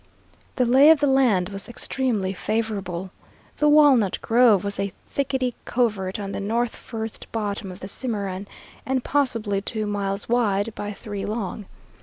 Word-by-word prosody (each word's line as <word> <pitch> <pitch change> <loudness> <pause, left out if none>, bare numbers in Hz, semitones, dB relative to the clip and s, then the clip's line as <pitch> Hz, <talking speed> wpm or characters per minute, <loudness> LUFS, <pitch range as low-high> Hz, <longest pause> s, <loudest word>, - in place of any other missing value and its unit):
The 250 - +2
lay 265 +5 +7
of 320 -2 +7
the 290 - +2
land 245 -10 +3
was 195 +3 -6
extremely 235 -6 -2
favorable. 195 -4 -3 0.5
The 300 - +3
Walnut 280 -9 +5
Grove 230 -4 +4
was 200 0 -3
a 200 0 -1 0.2
thickety 265 -3 -1
covert 210 -6 -1
on 200 -1 -4
the - - -4
north 230 +4 -1
first 225 -2 -7
bottom 205 -3 -3
of 180 - -11
the 190 - -6
Cimarron, 200 -4 -4 0.4
and 260 -1 -1
possibly 230 -8 0
two 215 +1 -3
miles 200 -1 -2
wide 220 -3 +1
by 205 -1 -5
three 205 -1 -6
long. 210 -2 -4
215 Hz, 155 wpm, -24 LUFS, 200-245 Hz, 0.5 s, lay